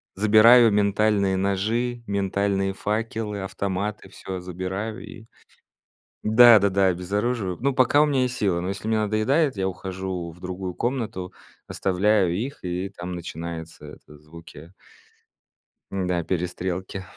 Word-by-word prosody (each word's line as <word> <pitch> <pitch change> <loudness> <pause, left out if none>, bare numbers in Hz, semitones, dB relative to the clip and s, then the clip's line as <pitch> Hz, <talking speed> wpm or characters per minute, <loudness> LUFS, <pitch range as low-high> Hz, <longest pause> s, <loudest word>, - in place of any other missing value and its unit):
забираю 110 +3 +6
ментальные 100 -1 +2
ножи, 110 +6 -1
ментальные 100 0 0
факелы, 105 0 -3
автоматы, 100 +1 -4
всё 95 0 -7
забираю 95 +5 -5
и 115 -1 -12 1.0
да-да-да, 105 -4 +6
обезоруживаю. 100 +2 -1
Но 140 +2 +1
пока 130 +3 +4
у - - +5
меня 140 -3 +1
есть 125 -1 -2
силы, 95 -6 0
но 90 - -4
если 100 +2 -5
мне 110 0 +1
надоедает, 110 +8 +1
я 95 -1 -1
ухожу 95 -2 -5
в 85 - -17
другую 90 0 -5
комнату, 110 -6 -3 0.4
оставляю 95 -1 +1
их 130 +9 -4
и 90 +2 -3
там 90 -2 -7
начинаются 85 -1 -7
это 75 - -14
звуки 80 +2 -14 1.2
м-да, 90 -3 -1
перестрелки. 90 +2 -3
100 Hz, 120 wpm, -24 LUFS, 90-110 Hz, 1.2 s, забираю